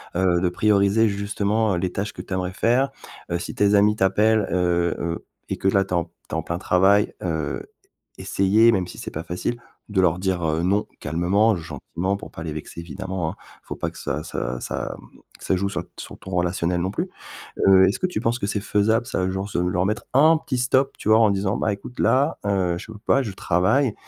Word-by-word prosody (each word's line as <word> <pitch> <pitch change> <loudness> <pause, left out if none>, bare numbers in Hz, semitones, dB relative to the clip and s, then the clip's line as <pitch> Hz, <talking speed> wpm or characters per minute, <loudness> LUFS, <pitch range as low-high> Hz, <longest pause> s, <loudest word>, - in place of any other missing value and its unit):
Heu, 90 -1 +3
de 90 - +2
prioriser 105 +3 +3
justement 100 +1 0
les 90 +1 -1
tâches 100 +3 -3
que - - -7
tu - - -7
aimerais 90 0 -2
faire. 125 +7 +2 0.4
Heu, 85 - 0
si - - -6
tes 105 0 +3
amis 105 +1 +4
t'appellent, 105 +3 +3
heu 85 -1 +1
heu, 85 0 -3 0.2
et - - -2
que 95 - -1
là 95 0 +4
tu - - -20
es - - +3
en 85 - 0
tu - - -28 0.2
es - - -7
en 80 - 0
plein 85 - -3
travail, 95 +3 +3
heu 80 -4 -2 0.6
essayer 105 +4 +3
-même 95 -5 0
si - - -10
c'est - - -6
pas 80 - -5
facile- 120 +8 -3 0.3
de 105 -2 0
leur 90 -1 +3
dire, 90 -3 -1
heu, 80 +1 0
non, 100 +3 +2 0.2
calmement, 100 +6 +2
gentiment 85 +4 -3
pour 100 - -9
pas 80 - -8
les 80 - -4
vexer, 75 +2 -8
évidemment, 90 0 -4
hein. - - -12 0.3
Il - - -35
faut - - -5
pas - - -3
que - - -15
ça 75 +3 -3
ça 65 -1 -4
ça, - - -4
mmh, - - -17 0.2
ça 95 - 0
joue 100 +2 0
sur - - -3
sur - - -9
ton 95 - -10
relationnel, 90 0 0
non 95 +2 -1
plus. 175 - -3 0.6
Heu, 95 -1 +7
est-ce 100 - -1
que 185 - +2
tu 180 - -3
penses 115 +1 0
que - - -1
c'est 105 - -1
faisable 110 +3 +1
ça, 95 0 -1
genre 95 +2 -3
se 100 - -3
leur 90 +1 +1
mettre 105 0 -2
un 155 +4 +6
petit 130 -4 -3
stop, 130 +2 +2
tu - - -4
vois? 110 +1 +6
En 110 -2 +5
disant: 100 0 0
«Bah, 105 - +1
écoute 100 +5 -8
là, 140 +4 +2
heu, 95 -4 +1
je 110 +4 -10
peux 105 - -10
pas, 135 +5 +2
je 110 - -4
travaille, 95 - +1
95 Hz, 230 wpm, -23 LUFS, 90-105 Hz, 0.6 s, Heu